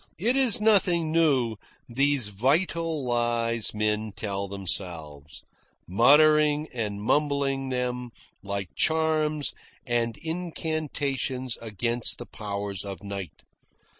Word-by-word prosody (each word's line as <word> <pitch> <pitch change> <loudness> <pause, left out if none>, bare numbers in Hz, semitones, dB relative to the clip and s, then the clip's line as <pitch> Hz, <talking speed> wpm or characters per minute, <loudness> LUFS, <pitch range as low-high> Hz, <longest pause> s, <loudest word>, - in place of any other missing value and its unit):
"It 230 +9 +1
is 255 -4 +5
nothing 180 -7 +3
new, 135 -9 +2 0.3
these 135 -2 +1
vital 155 - 0
lies 120 -2 0
men 105 0 -1
tell 100 -2 -3
themselves, 85 -7 -2 0.4
muttering 150 - +4
and 105 -4 -3
mumbling 135 +2 0
them 125 -1 -2 0.3
like 100 -2 -5
charms 155 -2 +1 0.3
and 120 -2 -1
incantations 155 -6 -3
against 115 +2 -1
the - - -8
powers 100 -2 -4
of 100 -2 -7
Night. 100 -5 -7
125 Hz, 100 wpm, -26 LUFS, 105-155 Hz, 0.4 s, is